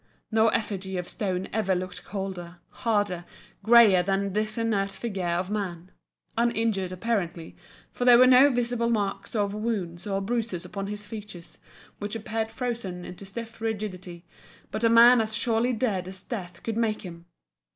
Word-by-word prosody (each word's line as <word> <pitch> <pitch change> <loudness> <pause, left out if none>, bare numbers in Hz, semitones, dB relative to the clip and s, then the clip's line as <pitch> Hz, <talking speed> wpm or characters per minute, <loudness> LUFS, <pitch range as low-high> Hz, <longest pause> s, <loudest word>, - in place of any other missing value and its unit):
No 220 0 +4
effigy 195 -4 -1
of 180 -1 -4
stone 190 -3 -2
ever 200 -3 +1
looked 180 0 -5
colder, 185 -3 -6
harder, 205 -6 -1 0.4
greyer 220 -4 +7
than 195 +1 -1
this 215 +2 -1
inert 210 -4 0
figure 195 -6 -3
of 175 +3 -1
man, 185 -4 -4 0.4
uninjured 225 -5 +1
apparently, 180 -4 -2 0.4
for - - -4
there 245 -1 +8
were 255 - +8
no 255 +2 +7
visible 240 -2 0
marks 200 -2 -2
of 205 -2 0
wounds 205 -5 -3
or 195 -1 0
bruises 215 -4 -2
upon 195 +2 -5
his 210 0 -5
features, 205 -5 -9 0.4
which 205 +1 -4
appeared 220 0 -2
frozen 225 -8 -4
into 190 +2 -9
stiff 225 +2 -8
rigidity, 190 -6 -4 0.5
but 220 - -3
a 230 - +5
man 235 +1 +8
as 220 0 -2
surely 230 +2 +1
dead 215 -6 -1
as 185 0 -6
death 180 -8 -7
could 225 -1 -3
make 220 -2 0
him! 170 -2 -10
205 Hz, 160 wpm, -27 LUFS, 185-230 Hz, 0.5 s, there